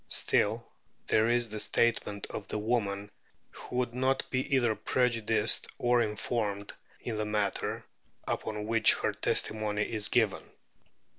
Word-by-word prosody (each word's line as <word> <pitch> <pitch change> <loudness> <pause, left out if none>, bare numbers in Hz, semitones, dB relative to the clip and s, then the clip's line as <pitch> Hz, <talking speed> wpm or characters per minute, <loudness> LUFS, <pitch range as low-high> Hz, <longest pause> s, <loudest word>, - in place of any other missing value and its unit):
Still, - - +1 0.4
there 110 +1 +3
is 120 -1 +2
the 110 0 -5
statement 105 -3 0
of 105 - -6
the - - -3
woman, 105 -2 -1 0.4
who - - -9
would 125 -1 0
not 130 +2 0
be 130 - +1 0.2
either 120 -4 +3
prejudiced 115 -2 +1
or 120 0 +3
informed, 105 -2 -2 0.3
in 115 -3 -4
the 110 - -1
matter 105 -2 -1 0.4
upon 105 -1 -3
which 115 +1 +6
her - - -1
testimony 105 -1 -1
is 110 -1 -1
given. 110 -5 0
110 Hz, 135 wpm, -30 LUFS, 105-120 Hz, 0.4 s, which